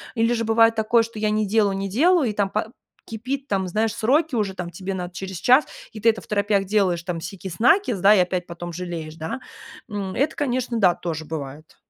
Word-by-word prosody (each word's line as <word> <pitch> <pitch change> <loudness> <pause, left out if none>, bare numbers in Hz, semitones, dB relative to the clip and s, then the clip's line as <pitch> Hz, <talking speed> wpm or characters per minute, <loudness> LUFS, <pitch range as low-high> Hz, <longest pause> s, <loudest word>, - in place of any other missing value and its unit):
или 230 +1 +2
же 230 -1 -1
бывает 225 +1 +4
такое, 220 +1 +3
что 225 -1 -9
я 215 0 +1
не 215 -1 0
делаю, 205 -2 +2
не 195 0 -3
делаю, 300 - +3
и - - -3
там 200 -1 0
па 215 +1 -1 0.4
кипит, 260 +5 -5
там, 190 -2 0
знаешь, 215 +4 0
сроки 275 +5 +1
уже, 205 -3 0
там, 180 -2 -5
тебе 185 +3 -5
надо 180 -1 -5
через 190 -1 -6
час, 255 - +5 0.3
и 215 - -9
ты 225 - 0
это 220 - 0
второпях 205 -1 0
делаешь, 185 -4 +1
там, 175 -2 -3
сикись-накись, 200 - +1
и 200 +2 +6
опять 180 0 -1
потом 175 0 -7
жалеешь, 165 -3 -6
да, 160 +9 -5 0.5
м. 200 -3 -4
Это, 290 +4 0
конечно, 250 -4 -1
да, 180 -4 +5
тоже 160 -3 -5
бывает. 150 -1 -7
205 Hz, 205 wpm, -23 LUFS, 180-230 Hz, 0.5 s, и